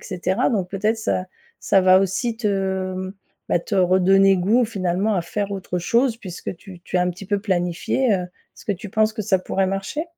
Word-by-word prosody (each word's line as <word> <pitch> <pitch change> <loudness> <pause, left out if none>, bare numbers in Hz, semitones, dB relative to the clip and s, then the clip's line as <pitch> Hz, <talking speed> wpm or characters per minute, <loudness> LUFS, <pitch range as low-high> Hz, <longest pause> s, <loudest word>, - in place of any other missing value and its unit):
cetera 185 +5 0
donc 195 -7 -1
peut-être 210 +4 -1
ça 185 -4 -1 0.4
ça 195 - +3
va 185 0 +6
aussi 225 +5 -1
te, 190 -3 -1
mmh, 185 +1 -5 0.3
bah - - +3
te - - -5
redonner 190 +1 +4
goût 220 +7 +2
finalement 195 0 -1
à 180 - 0
faire 200 +4 -3
autre 185 -2 -3
chose 230 +6 +1
puisque 185 -3 -7
tu 185 -1 -13
tu 180 - -1
as - - +3
un 180 - +1
petit 180 +3 -9
peu 205 0 0
planifié, 190 +5 0
heu, 185 - -1
est-ce 180 - -18
que 205 - +1
tu 195 +1 -8
penses 215 +1 +2
que 220 - -3
ça 190 -1 +2
pourrait 190 +1 -1
marcher? 195 - -3
195 Hz, 205 wpm, -22 LUFS, 185-210 Hz, 0.4 s, va